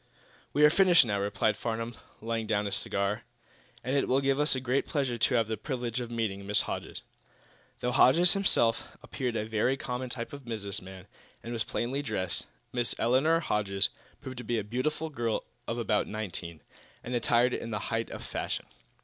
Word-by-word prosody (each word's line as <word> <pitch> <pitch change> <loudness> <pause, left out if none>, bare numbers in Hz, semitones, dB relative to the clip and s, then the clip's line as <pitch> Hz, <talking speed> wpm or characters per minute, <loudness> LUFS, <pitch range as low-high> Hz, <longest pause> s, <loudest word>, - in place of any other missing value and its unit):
"We 150 +1 +5
are 150 - +7
finished, 180 -5 +6
now," 100 -3 0
replied 105 +2 +1
Mr. - - -16
Farnum, 115 0 -3 0.3
laying 115 0 -2
down 105 0 +1
his 100 - -2
cigar, 100 +3 -1 0.6
"and 130 +3 -1
it 140 - +2
will 130 - +3
give 135 0 +1
us 150 -1 +3
great 130 +1 0
pleasure 135 -6 -1
to 125 - +3
have 115 -2 +3
the 110 0 -2
privilege 125 0 -3
of 120 - -5
meeting 105 -4 -2
Miss 105 - +5
Hodges." - - -5 0.8
Though 125 - 0
Hodges 165 +8 +6
himself 150 - +2
appeared 125 -3 -3
a 105 - -1
very 110 +4 +1
common 125 -1 -4
type 120 +3 -5
of 140 -1 -8
business 105 -4 -3
man, 95 0 -10 0.4
and 120 - -5
was 115 -1 0
plainly 130 +4 -2
dressed, 95 -9 -1 0.3
Miss 120 -1 0
Elinor 145 +8 +3
Hodges 100 - +1 0.3
proved 130 -1 -7
to - - -6
be 120 +1 -1
a 110 - -1
beautiful 150 +8 -2
girl 115 -5 -1 0.2
of 115 - -2
about 105 -3 +1
nineteen, 90 -6 -5 0.4
and 125 - -5
attired 120 +1 +3
in - - -3
the 105 - -2 0.2
height 115 0 0
of - - -7
fashion. - - -3
120 Hz, 190 wpm, -30 LUFS, 110-130 Hz, 0.8 s, are